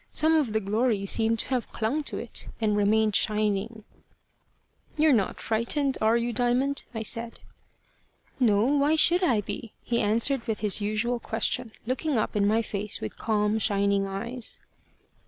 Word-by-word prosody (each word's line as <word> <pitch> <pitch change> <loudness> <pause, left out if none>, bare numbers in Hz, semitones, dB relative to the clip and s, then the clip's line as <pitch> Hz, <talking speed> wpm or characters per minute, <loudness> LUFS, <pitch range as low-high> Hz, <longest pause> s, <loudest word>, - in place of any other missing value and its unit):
Some 315 +1 +2
of 290 -9 +1
the 220 - +2
glory 215 0 0
seemed 225 +3 +1
to - - -8
have 255 -3 -2
clung 240 +8 -1
to - - -2
it, 235 - -5
and 215 -2 +1
remained 210 +1 +2
shining. 215 +1 0 1.1
"You're 305 -1 +4
not 205 -6 0
frightened 260 +5 0
are 220 +2 +3
you, 235 0 -2
Diamond?" 250 +4 +1
I 225 -2 -4
said. 230 +1 -1 1.0
"No. 210 -5 +3
Why 290 +3 +2
should 340 +3 +4
I 245 - +2
be?" 205 +2 -7
he 235 -1 0
answered 230 +4 +1
with 220 -2 -2
his 210 -1 +3
usual 215 +4 -1
question, 230 +1 -2
looking 260 +3 -1
up 215 - -1
in 200 -1 +2
my 225 +2 +2
face 210 -1 -2
with 110 - -6
calm 210 0 0
shining 200 -1 +1
eyes. 235 +5 -3
225 Hz, 160 wpm, -26 LUFS, 210-250 Hz, 1.1 s, You're